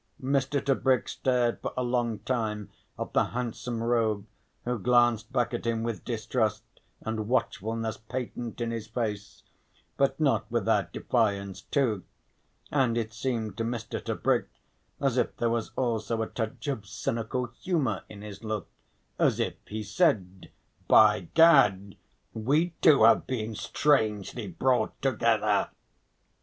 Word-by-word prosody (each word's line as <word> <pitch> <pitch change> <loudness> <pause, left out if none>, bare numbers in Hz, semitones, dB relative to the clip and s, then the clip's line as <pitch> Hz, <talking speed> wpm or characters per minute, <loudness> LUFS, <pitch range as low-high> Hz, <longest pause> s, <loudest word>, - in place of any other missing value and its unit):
Mr. 135 +1 +1
Tebrick 130 -3 +2
stared 125 -2 0
for - - -4
a 125 - +1
long 120 -2 0
time 105 -5 -2 0.3
at - - -5
the - - +4
handsome 120 -1 -4
rogue, 110 -4 +1 0.4
who 125 -1 -1
glanced 120 -1 +3
back 120 0 0
at 120 - -3
him 115 -1 0
with 115 -2 -3
distrust 115 -1 -1 0.4
and 110 -1 -3
watchfulness 115 -2 -1
patent 120 0 -5
in 115 -1 -1
his 115 -2 -4
face, 105 -3 -4 0.5
but - - +1
not - - +1
without - - +1
defiance 100 -5 0
too, 115 - 0 0.7
and 130 -5 +2
it 110 -1 -2
seemed 115 -4 -2
to 115 - -2
Mr. 115 -1 -4
Tebrick - - 0 0.5
as 135 -3 +1
if - - -1
there 115 -1 +1
was 115 -1 -1
also 115 -2 -1
a - - -4
touch 115 +3 -5
of 110 -8 -3
cynical 115 +5 -2 0.2
humour 155 -11 0
in 105 -1 -10
his 105 0 -9
look, 110 -3 -3 0.5
as - - +3
if - - 0
he 110 +1 -4
said: 95 -2 0 0.4
"By 90 -3 +5
Gad! 100 - +5 0.4
we 145 +10 +1
two 145 -8 +6
have 115 - +5
been 115 -4 -3
strangely 110 -4 0
brought 125 +8 0
together!" 110 -5 +2
115 Hz, 140 wpm, -28 LUFS, 110-125 Hz, 0.7 s, two